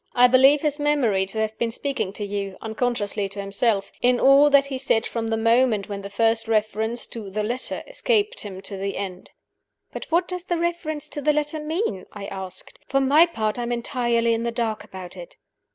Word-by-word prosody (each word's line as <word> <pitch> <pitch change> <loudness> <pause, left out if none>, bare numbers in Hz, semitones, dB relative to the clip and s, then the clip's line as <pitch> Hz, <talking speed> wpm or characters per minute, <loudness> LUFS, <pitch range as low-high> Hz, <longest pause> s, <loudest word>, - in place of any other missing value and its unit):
I 250 0 +7
believe 270 +4 +5
his 295 -1 0
memory 250 -10 +1
to 195 - -7
have 220 0 -2
been 235 - 0
speaking 270 -4 -3
to 210 - -4
you 200 -1 -4
(unconsciously 220 -3 -1
to 200 +1 -9
himself) 200 +1 0
in 245 0 +3
all 275 +2 +6
that 280 -1 +5
he 270 -2 -5
said 235 -4 +1
from 230 -1 -3
the 225 0 0
moment 230 -2 +2
when 200 -1 -4
the 200 - -7
first 225 +2 +1
reference 220 +1 0
to 220 -4 -8
'the 210 +2 -2
letter' 240 +4 -2
escaped 485 -2 0
him 190 -2 -6
to 195 0 -5
the 195 +1 -3
end." 185 -2 -6 0.6
"But - - -6
what 345 +2 +2
does 360 -1 -5
the 345 - -1
reference 320 -3 -2
to 290 - -4
the 300 +2 +3
letter 300 +1 -1
mean?" 305 - -3
I 205 -1 -7
asked. 190 -1 -8
"For 275 - +2
my 290 +5 +5
part, 220 -7 -2
I - - -1
am 240 0 -3
entirely 235 -1 0
in 225 - -1
the 235 - -1
dark 230 -2 -2
about 185 -1 -10
it." 175 -2 -11
230 Hz, 210 wpm, -23 LUFS, 205-280 Hz, 0.6 s, I